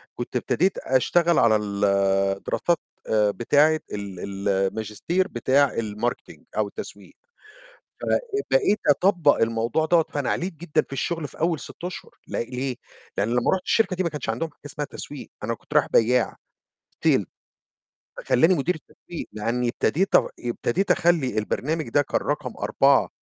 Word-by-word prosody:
كنت 120 +1 -6
ابتديت 180 +9 +1
أشتغل 170 +6 +2
على 110 -2 +5
ال 100 -1 -2 0.6
دراسات، 170 -1 +1 0.3
آآ، 105 -2 +3
بتاعة 150 +7 +3
ال 100 -3 -5
ال 100 0 -3
الماجستير 105 - 0
بتاع 130 +4 +2
الmarketing 110 +2 -3 0.2
أو - - +2
التسويق - - -9 0.9
فبقيت 415 - +1
أطبّق 170 -1 +4
الموضوع 115 +7 +1
دوَّة، 165 -1 +4
فأنا 145 -3 -1
عليت 180 +2 -1
جدًا 160 0 0
في - - -20
الشغل 160 +2 -2
في - - -15
أول 165 -2 +1
6 175 - -10
أشهر، 180 - -6 0.2
ل - - -12 0.2
ليه؟ 130 -1 -2 0.4
لأن 100 - +1
لمّا 120 +1 +2
رُحت 185 - -2
الشركة 205 -5 +2
دي 185 - +1
ما 175 - 0
كانش 150 -6 -6
عندهم 125 +9 -2
حاجة - - -34
اسمها 145 0 -4
تسويق 145 -2 -8
أنا 115 +2 -1
كنت - - -12
رايح - - +5
بياع، 120 +1 +3 0.7
Sale، - - +4 0.9
فخلّاني 160 +9 +3
مدير 170 +5 0
التسويق، 160 +2 -9
لإني 115 +3 -1
ابتديت 180 +9 +1
أغ - - +5
ابتديت 120 +10 -1
أخلّي 155 -10 +2
البرنامج 150 +9 -1
ده 145 - +3
كان - - -1
رقم - - -2
4 - - +3
140 Hz, 150 wpm, -24 LUFS, 115-170 Hz, 0.9 s, على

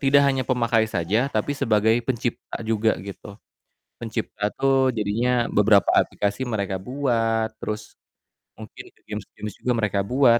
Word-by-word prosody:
tidak 140 0 +5
hanya 135 -1 +2
pemakai 115 -3 +2
saja, 110 +8 0
tapi 110 +3 -1
sebagai 110 -2 +3
pencipta 120 -2 -3
juga 110 0 +1
gitu. 100 +1 -9 0.7
Pencipta 110 -2 -3
tuh 135 -1 +3
jadinya 115 +3 +1
beberapa 105 -1 +4
aplikasi 100 +4 -2
mereka 100 -4 -2
buat, 115 -3 0
terus 105 0 -5 0.7
mungkin - - -10 0.2
games-games 105 -1 -7
juga 125 - -1
mereka 105 -2 0
buat, 125 0 +4
110 Hz, 125 wpm, -24 LUFS, 105-125 Hz, 0.7 s, tidak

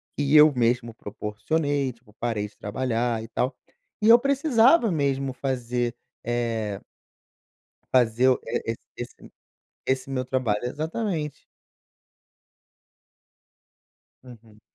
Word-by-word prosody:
que 145 +1 +1
eu 150 0 +8
mesmo 120 -1 +1
proporcionei, 130 +8 -2
tipo, 115 -2 -24
parei 110 -3 -1
de 105 - -22
trabalhar 115 +1 -1
e - - -8
tal, 125 +3 -1 0.5
e - - +4
eu 235 +1 +9
precisava 270 - +4
mesmo 135 -4 0
fazer, 125 -2 -2 0.3
eh 115 -4 -2 1.1
fazer 125 0 +4 0.2
e 115 - -2 0.2
esse - - -9 0.6
esse 130 0 -1
meu 130 -1 -1
trabalho, 120 -4 -1
exatamente. 155 - -3 2.8
Uhum. 115 -4 -15
125 Hz, 100 wpm, -25 LUFS, 115-145 Hz, 2.8 s, eu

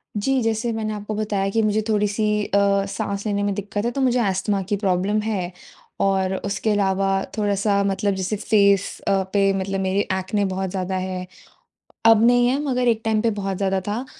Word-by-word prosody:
जी, 260 +6 +1
जैसे 225 +1 0
मैंने 215 -1 -3
आपको 210 +1 -5
बताया 205 -2 -1
कि 225 +3 +1
मुझे 215 0 +1
थोड़ी-सी 210 0 +1 0.2
अ, 200 0 +2
साँस 200 +1 -4
लेने 205 -1 0
में 205 0 0
दिक्कत 205 +1 -3
है 240 - 0
तो 275 - -3
मुझे 250 -1 +2
अस्थमा 195 -1 0
की 205 - +2
प्रॉब्लम 195 +1 0
है। 200 -5 -2 0.5
और 190 -1 +1
उसके 200 +2 -1
अलावा 195 -1 +1 0.3
थोड़ा-सा 200 -1 +1
मतलब 200 +1 0
जैसे 190 +2 -2
फेस 200 -2 +2
अ, - - +3 0.2
पे 200 -1 +3
मतलब 195 +1 -2
मेरे 190 +1 0 0.2
एक्ने 200 +2 -1
बहुत 190 0 -2
ज़्यादा 190 0 -3
है। 185 0 -4 0.8
अब 225 -1 +6
नहीं 245 0 +4
है 260 +2 +1
मगर 250 -4 0
एक 225 -2 +2
टाइम 220 -1 +1
पे 230 - +2
बहुत 195 -1 -2
ज़्यादा 195 0 0
था 220 +5 -2
200 Hz, 190 wpm, -22 LUFS, 195-215 Hz, 0.8 s, अब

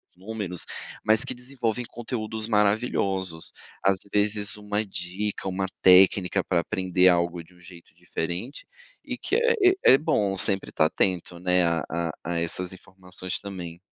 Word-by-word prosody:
os - - -36
números, 95 -3 -4 0.4
mas 110 +3 +4
que - - -4
desenvolvem 125 -2 -3
conteúdos 110 -2 -5
maravilhosos. 100 -5 0 0.3
Às 95 -1 +4
vezes, 105 0 +2
uma 105 0 -2
dica, 95 +1 -4
uma 95 +1 -1 0.2
técnica 95 0 +5
para 90 -2 +1
aprender 90 +1 +2
algo 85 -1 +1
de 90 +2 -22
um - - -21
jeito 90 -1 -14
diferente, 90 - -5 0.4
e - - -4
que - - -1
é 465 -6 +4 0.2
é - - +7
bom 100 -9 +1
sempre 95 0 -1
estar 80 - +2
atento, 90 0 -1
né, 90 0 +2
a 85 -1 +1
a 85 -1 -2
a 85 0 -2
essas 90 +2 -1
informações 90 0 -6
também. 90 -4 -8
95 Hz, 150 wpm, -25 LUFS, 90-105 Hz, 0.4 s, é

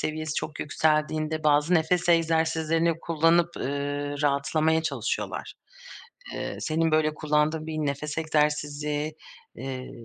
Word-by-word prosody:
seviyesi 155 0 -3
çok 155 - -4
yükseldiğinde 155 +1 0
bazı 150 +3 +4
nefes 175 +2 +2
egzersizlerini 165 0 +2
kullanıp, 170 +1 +2
eee, 145 +1 -3
rahatlamaya 155 +3 +2
çalışıyorlar. - - -3 0.8
Eee, - - -4
senin 160 +1 +1
böyle 155 0 +2
kullandığın 155 +1 0
bir 160 -1 -4
nefes 150 +1 -2
egzersizi, 150 -1 0 0.4
eee, 130 -1 -6
155 Hz, 110 wpm, -26 LUFS, 150-160 Hz, 0.8 s, bazı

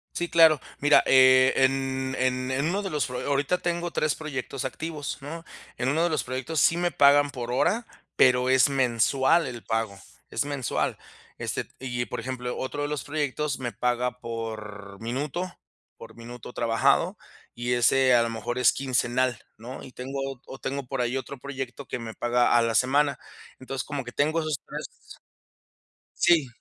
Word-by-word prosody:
Sí 175 0 -2
claro. 160 -3 +6 0.2
Mira, 145 +1 +6
e 130 0 +6
en 135 0 +1
en 130 0 0
en 140 +3 0
uno 195 +4 -1
de 195 - -4
los 150 -5 0
fro 125 0 -5
Ahorita 145 +5 +1
tengo 175 0 -2
3 155 -3 0
proyectos 135 -3 -5
activos, 150 +3 -4
¿no? 165 +4 -7 0.4
En 125 - +1
1 160 +4 +2
de 175 - +2
los 155 - 0
proyectos, 130 +5 -3
sí 165 - +4
me 175 0 +1
pagan 145 0 +5
por 120 -2 -5
hora, 225 - +1 0.3
pero, 125 0 +4
es 130 +1 +5
mensual 135 +4 +2
el 120 -3 -7
pago, 110 -3 -2 0.3
es - - -1
mensual. 140 -4 -2 0.4
Este, - - -3
y, 120 -2 -3
por - - -5
ejemplo, 125 0 -4
otro 145 +2 -3
de - - -1
los 150 -3 -3
proyectos, 150 -1 -2
me 125 -2 -4
paga 125 +1 -1
por 110 -4 -7
minuto 145 +10 -3 0.5
por - - -12
minuto 120 0 -10
trabajado, 115 -2 +2 0.4
y 120 +1 -1
ese 130 +2 +4
a 120 -1 +5
lo 115 - -1
mejor 115 +2 -4
es 125 - +5
quincenal, 125 -2 0 0.2
¿no? 120 +4 -9
Y 130 - -12
tengo 135 +2 -5 0.3
ot 135 - -10
tengo 140 0 -3
por 135 +1 -4
ahí 120 +1 -1
otro 135 +1 -6
proyecto, 135 0 -6
que - - -3
me 115 -2 -7
paga 120 +1 +2
a - - +5
la 115 -1 0
semana. 140 +4 +3 0.4
Entonces, 130 0 -4
como 145 -2 -4
que 120 - -8
tengo 155 +5 +1
esos 155 -2 -2
3 - - -6 1.3
Sí. 165 -6 +5
130 Hz, 175 wpm, -26 LUFS, 120-145 Hz, 1.3 s, claro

